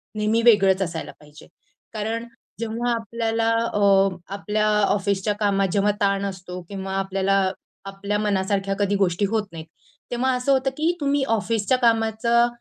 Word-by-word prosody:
नेहमी 215 Hz, +2 st, +1 dB
वेगळंच 195 Hz, -5 st, +5 dB
असायला 165 Hz, -3 st, -3 dB
पाहिजे. 150 Hz, 0 st, -16 dB, 0.5 s
कारण 225 Hz, +2 st, -3 dB, 0.3 s
जेव्हा 230 Hz, +2 st, -2 dB
आपल्याला 225 Hz, 0 st, -1 dB, 0.2 s
अ, 195 Hz, -1 st, +4 dB, 0.3 s
आपल्या 210 Hz, +1 st, -1 dB, 0.2 s
ऑफिसच्या 200 Hz, 0 st, 0 dB
कामात 200 Hz, -2 st, +2 dB
जेव्हा 205 Hz, 0 st, +2 dB
ताण 200 Hz, 0 st, +1 dB
असतो 180 Hz, -2 st, -6 dB
किंवा 195 Hz, -1 st, -5 dB
आपल्याला 195 Hz, 0 st, +1 dB, 0.4 s
आपल्या 200 Hz, +1 st, -3 dB
मनासारख्या 195 Hz, -1 st, 0 dB
कधी 205 Hz, 0 st, +1 dB
गोष्टी 195 Hz, +1 st, +1 dB
होत 215 Hz, -2 st, -1 dB
नाहीत, 160 Hz, -1 st, -8 dB, 0.5 s
तेव्हा 255 Hz, +2 st, +1 dB
असं 250 Hz, +2 st, 0 dB
होतं 270 Hz, 0 st, +2 dB
की 320 Hz, +3 st, +2 dB
तुम्ही 280 Hz, -1 st, +1 dB
ऑफिसच्या 225 Hz, +2 st, +1 dB
कामाचा 235 Hz, 0 st, +2 dB
205 Hz, 140 wpm, -23 LUFS, 195-230 Hz, 0.5 s, वेगळंच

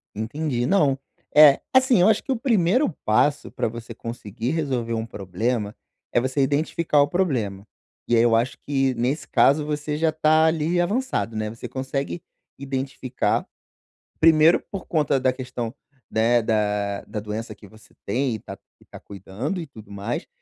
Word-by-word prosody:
Entendi. 120 Hz, +3 st, -2 dB
Não. 145 Hz, -4 st, +3 dB, 0.4 s
É, 150 Hz, -2 st, +8 dB
assim, 260 Hz, -6 st, +5 dB
eu 180 Hz, -, +6 dB
acho 220 Hz, -1 st, +3 dB
que 270 Hz, -, -4 dB
o 255 Hz, -, -1 dB
primeiro 235 Hz, -, +2 dB, 0.2 s
passo 145 Hz, +7 st, +2 dB
pra -, -, -1 dB
você 115 Hz, +1 st, -7 dB
conseguir 115 Hz, +1 st, -5 dB
resolver 130 Hz, -8 st, -1 dB
um 110 Hz, 0 st, -2 dB
problema 105 Hz, +2 st, -3 dB, 0.4 s
é -, -, +4 dB
você 130 Hz, +3 st, -1 dB
identificar 150 Hz, +2 st, +1 dB
o 145 Hz, -, +3 dB
problema. 120 Hz, -, -1 dB, 0.4 s
E 120 Hz, -, +3 dB
aí 115 Hz, -, +5 dB
eu 115 Hz, -1 st, +4 dB
acho 120 Hz, +3 st, 0 dB
que, 135 Hz, -2 st, +1 dB
nesse 130 Hz, +5 st, -1 dB
caso, 145 Hz, +2 st, +3 dB
você 150 Hz, 0 st, -3 dB
já 160 Hz, 0 st, +2 dB
tá, 155 Hz, 0 st, +3 dB
ali, 160 Hz, +2 st, +1 dB
avançado, 210 Hz, -, -1 dB
né. 110 Hz, 0 st, -2 dB
Você 115 Hz, -, -8 dB
consegue 135 Hz, +5 st, -4 dB, 0.4 s
identificar, 135 Hz, -1 st, -2 dB, 0.7 s
primeiro 160 Hz, +1 st, +6 dB
por 195 Hz, -2 st, -6 dB
conta 150 Hz, -4 st, +1 dB
da 130 Hz, 0 st, +2 dB
questão, 125 Hz, -2 st, -5 dB, 0.4 s
né, 115 Hz, +2 st, +3 dB
da 105 Hz, -2 st, 0 dB
da 105 Hz, 0 st, -5 dB
doença 110 Hz, +1 st, -5 dB
que 100 Hz, -, -15 dB
você 110 Hz, +2 st, -19 dB
tem 130 Hz, -2 st, 0 dB
e -, -, -6 dB
tá -, -, -9 dB, 0.2 s
e -, -, -21 dB
tá -, -, -12 dB
cuidando 105 Hz, -, -5 dB
e 160 Hz, -, -7 dB
tudo 110 Hz, -6 st, -14 dB
mais. 100 Hz, 0 st, -4 dB
130 Hz, 165 wpm, -23 LUFS, 115-155 Hz, 0.7 s, É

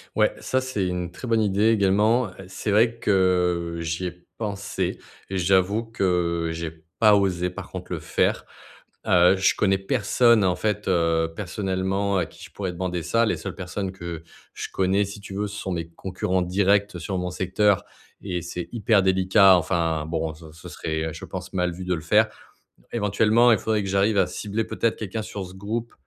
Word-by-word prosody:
Ouais, -, -, +3 dB
ça, 130 Hz, -, 0 dB
c'est 130 Hz, -8 st, -2 dB
une 90 Hz, -1 st, -3 dB
très 125 Hz, -, -8 dB
bonne 115 Hz, -1 st, +2 dB
idée 105 Hz, +1 st, +2 dB
également. 105 Hz, +2 st, +3 dB, 0.2 s
C'est 95 Hz, +3 st, -3 dB
vrai 115 Hz, +3 st, +3 dB
que 90 Hz, -5 st, +1 dB
j'y 85 Hz, +2 st, -3 dB
ai 90 Hz, 0 st, -10 dB
pensé 100 Hz, -2 st, -3 dB, 0.3 s
et 95 Hz, -, -2 dB
j'avoue 95 Hz, +4 st, +2 dB
que 90 Hz, -6 st, 0 dB
j'ai 80 Hz, -1 st, -6 dB, 0.2 s
pas 110 Hz, -2 st, +6 dB
osé 90 Hz, -3 st, +1 dB
par -, -, -8 dB
contre -, -, -8 dB
le -, -, -3 dB
faire, -, -, 0 dB, 0.6 s
heu, 90 Hz, +1 st, +5 dB
je 95 Hz, 0 st, +3 dB
connais 95 Hz, -1 st, +2 dB
personne, 105 Hz, +3 st, +3 dB
en 90 Hz, -1 st, +2 dB
fait, 105 Hz, -1 st, -2 dB
heu, 85 Hz, -2 st, +2 dB
personnellement 95 Hz, +1 st, -1 dB
à 90 Hz, -, +1 dB
qui -, -, -15 dB
je -, -, -11 dB
pourrais 95 Hz, -3 st, -4 dB
demander 90 Hz, -1 st, -3 dB
ça. 115 Hz, +6 st, +2 dB
Les -, -, 0 dB
seules -, -, -6 dB
personnes 95 Hz, +1 st, -4 dB
que 85 Hz, -3 st, -7 dB, 0.3 s
je -, -, -5 dB
connais, 95 Hz, +2 st, +2 dB
si 100 Hz, +1 st, -9 dB
tu 100 Hz, -, -9 dB
veux, 105 Hz, +1 st, -1 dB
ce 100 Hz, -, -8 dB
sont 95 Hz, -, -4 dB
mes 85 Hz, -2 st, -3 dB
concurrents 95 Hz, +1 st, -2 dB
directs 100 Hz, +1 st, +1 dB
sur 95 Hz, +2 st, -3 dB
mon 90 Hz, 0 st, -2 dB
secteur 95 Hz, +2 st, +1 dB, 0.4 s
et 90 Hz, -3 st, -3 dB
c'est 90 Hz, +1 st, -5 dB
hyper 110 Hz, -3 st, +2 dB
délicat. 95 Hz, +1 st, +5 dB
Enfin, 80 Hz, -3 st, 0 dB
bon, 80 Hz, -1 st, -2 dB
ce 80 Hz, 0 st, -13 dB
ce 85 Hz, +3 st, -12 dB
serait, 80 Hz, -1 st, -3 dB
heu, -, -, -7 dB
je 80 Hz, -, -10 dB
pense, 90 Hz, -1 st, -7 dB
mal 90 Hz, -1 st, 0 dB
vu 90 Hz, +2 st, -7 dB
de 90 Hz, -, 0 dB
le 80 Hz, -, -3 dB
faire. -, -, +4 dB, 0.7 s
Éventuellement, 110 Hz, +2 st, +3 dB
il 110 Hz, -, +4 dB
faudrait 110 Hz, -1 st, 0 dB
que 95 Hz, -, -4 dB
j'arrive 100 Hz, +2 st, +2 dB
à 95 Hz, -, +4 dB
cibler 105 Hz, +2 st, -3 dB
peut-être 115 Hz, +1 st, 0 dB
quelqu'un 110 Hz, +1 st, -4 dB
sur 105 Hz, -2 st, -6 dB
ce 90 Hz, -, -12 dB
groupe 110 Hz, +4 st, -4 dB
95 Hz, 195 wpm, -24 LUFS, 90-105 Hz, 0.7 s, pas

